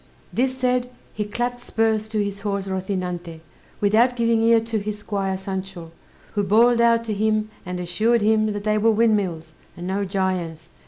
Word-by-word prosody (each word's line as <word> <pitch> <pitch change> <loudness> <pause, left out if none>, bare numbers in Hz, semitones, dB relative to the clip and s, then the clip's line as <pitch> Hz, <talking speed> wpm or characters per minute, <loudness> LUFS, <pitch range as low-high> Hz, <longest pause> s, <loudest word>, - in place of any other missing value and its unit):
This 260 +1 0
said, 250 -1 +1 0.2
he 210 - -2
clapped 240 +3 -2
spurs 220 -2 0
to 215 -1 0
his 200 0 -4
horse 200 -1 -2
Rozinante, 180 -3 -4 0.4
without 225 +5 +3
giving 230 -1 +2
ear 230 0 +5
to 225 -1 -2
his 210 +1 -4
squire 195 -2 -2
Sancho, 190 -3 -6 0.4
who 205 - +1
bawled 230 +4 +4
out 230 0 +4
to 220 - -2
him, 215 +1 0 0.2
and 180 0 -4
assured 215 +6 +1
him 215 0 +3
that 205 0 -5
they 215 0 +1
were 225 +2 +4
windmills, 200 -8 +1 0.2
and 175 - -6
no 195 +2 -1
giants. 180 -4 -2
210 Hz, 170 wpm, -23 LUFS, 190-225 Hz, 0.4 s, ear